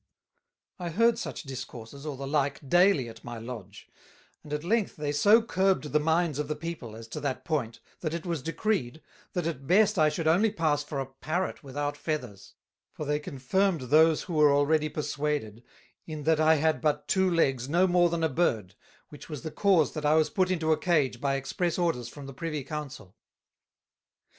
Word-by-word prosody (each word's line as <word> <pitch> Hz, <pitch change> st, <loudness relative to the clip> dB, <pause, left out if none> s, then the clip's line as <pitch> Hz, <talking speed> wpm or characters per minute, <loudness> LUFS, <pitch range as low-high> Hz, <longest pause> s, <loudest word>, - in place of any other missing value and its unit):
I 175 Hz, -1 st, -3 dB
heard 230 Hz, +6 st, +3 dB
such -, -, -5 dB
Discourses, 135 Hz, 0 st, -8 dB
or 145 Hz, -3 st, -4 dB
the 135 Hz, -, -5 dB
like, 140 Hz, 0 st, -1 dB
daily 175 Hz, -4 st, +4 dB
at 115 Hz, 0 st, -12 dB
my 120 Hz, -1 st, -7 dB
Lodge; 110 Hz, -4 st, -9 dB, 0.6 s
and 150 Hz, -, -12 dB
at 150 Hz, 0 st, -2 dB
length 215 Hz, +3 st, 0 dB
they 150 Hz, -1 st, -2 dB
so 205 Hz, +11 st, +5 dB
curbed 190 Hz, -7 st, +1 dB
the 150 Hz, -, +3 dB
minds 160 Hz, -1 st, +1 dB
of 150 Hz, -, -2 dB
the 150 Hz, -, -2 dB
people 155 Hz, -10 st, -6 dB
as 115 Hz, 0 st, -10 dB
to -, -, -5 dB
that 140 Hz, -3 st, -3 dB
point, 130 Hz, -8 st, -2 dB, 0.2 s
that 155 Hz, -1 st, -3 dB
it 170 Hz, -, -6 dB
was 170 Hz, -5 st, -2 dB
decreed, 160 Hz, -, -2 dB, 0.3 s
That 180 Hz, -3 st, -1 dB
at 140 Hz, -5 st, -4 dB
best 210 Hz, +1 st, +4 dB
I 155 Hz, -1 st, +5 dB
should 155 Hz, +1 st, -2 dB
only 185 Hz, +8 st, +4 dB
pass 155 Hz, -6 st, 0 dB
for 145 Hz, -1 st, -5 dB
a 135 Hz, -, -2 dB
Parrot 155 Hz, +9 st, -3 dB
without 145 Hz, +1 st, -3 dB
Feathers; 135 Hz, -10 st, -5 dB, 0.4 s
for 150 Hz, -, -6 dB
they 150 Hz, +1 st, 0 dB
confirmed 155 Hz, +5 st, 0 dB
those 155 Hz, +5 st, +4 dB
who 175 Hz, -, -6 dB
were 150 Hz, -2 st, +5 dB
already 150 Hz, +2 st, +2 dB
perswaded, 145 Hz, -7 st, -3 dB, 0.5 s
in 155 Hz, -2 st, -6 dB
that 160 Hz, +1 st, +2 dB
I 160 Hz, 0 st, +5 dB
had 160 Hz, +1 st, +1 dB
but 150 Hz, -1 st, 0 dB
two 190 Hz, -2 st, +2 dB
Legs 135 Hz, -7 st, +1 dB
no 175 Hz, +4 st, +4 dB
more 175 Hz, -1 st, +4 dB
than 165 Hz, -1 st, -2 dB
a -, -, +4 dB
Bird, 115 Hz, -, 0 dB, 0.4 s
which 150 Hz, -, -12 dB
was 150 Hz, -4 st, -6 dB
the 160 Hz, -, -5 dB
cause 185 Hz, -6 st, +3 dB
that 155 Hz, -, -5 dB
I 150 Hz, +1 st, +4 dB
was 155 Hz, -1 st, +2 dB
put 185 Hz, -2 st, +1 dB
into 165 Hz, -4 st, 0 dB
a 155 Hz, -, +2 dB
Cage 145 Hz, -9 st, +1 dB
by 140 Hz, -1 st, +1 dB
express 145 Hz, +6 st, -2 dB
orders 165 Hz, -10 st, -1 dB
from 145 Hz, +1 st, -10 dB
the 135 Hz, -, -8 dB
Privy 150 Hz, +1 st, -4 dB
Council. 135 Hz, -9 st, -7 dB
150 Hz, 195 wpm, -28 LUFS, 135-170 Hz, 0.6 s, so